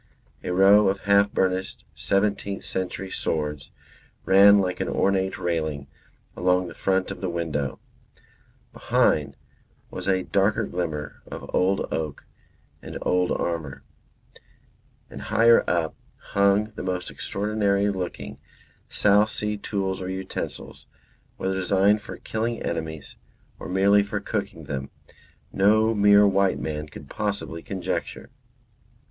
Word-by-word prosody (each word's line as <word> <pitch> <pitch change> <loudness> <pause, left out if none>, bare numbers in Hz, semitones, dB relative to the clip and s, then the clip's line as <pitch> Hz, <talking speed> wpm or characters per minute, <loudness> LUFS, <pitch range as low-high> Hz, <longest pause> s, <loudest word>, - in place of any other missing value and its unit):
A - - -4
row 100 +3 +6
of 95 0 0
half 100 0 +3
burnished 95 0 -1
seventeenth 100 0 -1
century 95 0 -4
swords 75 -2 -3 0.6
ran 100 +2 +7
like 95 -2 0
an - - -2
ornate 95 -1 +1
railing 80 -5 -2 0.5
along 90 0 +2
the 85 - -9
front 95 0 0
of 95 - -8
the 95 - -2
window; 75 -6 -3 0.9
behind 70 -2 +1 0.5
was 90 0 -6
a 95 -1 +2
darker 100 +4 +1
glimmer 80 -6 -4
of - - -8
old 95 +2 +2
oak 75 -3 -4 0.6
and - - -7
old 90 0 +1
armour; 80 -5 -3 1.3
and - - -8
higher 115 +1 +4
up 85 -2 0 0.4
hung 100 +2 +3
the - - -7
most 90 -1 -3
extraordinary 100 -1 0
looking 80 -8 -6 0.5
South 105 +1 +3
Sea 105 -1 -2
tools 95 -2 -3
or 90 - -4
utensils, 95 0 -6 0.5
whether 95 - -1
designed 95 +3 +2
for - - -9
killing 115 +1 -3
enemies 80 -2 -5 0.4
or - - -7
merely 100 +2 +4
for 100 - -3
cooking - - -4
them, 70 0 -5 0.6
no 110 +3 +4
mere 100 -1 +6
white 100 -1 +2
man 75 -1 -4
could 75 -1 -11
possibly 100 -5 -3
conjecture. 95 0 -4
95 Hz, 125 wpm, -25 LUFS, 85-100 Hz, 1.3 s, ran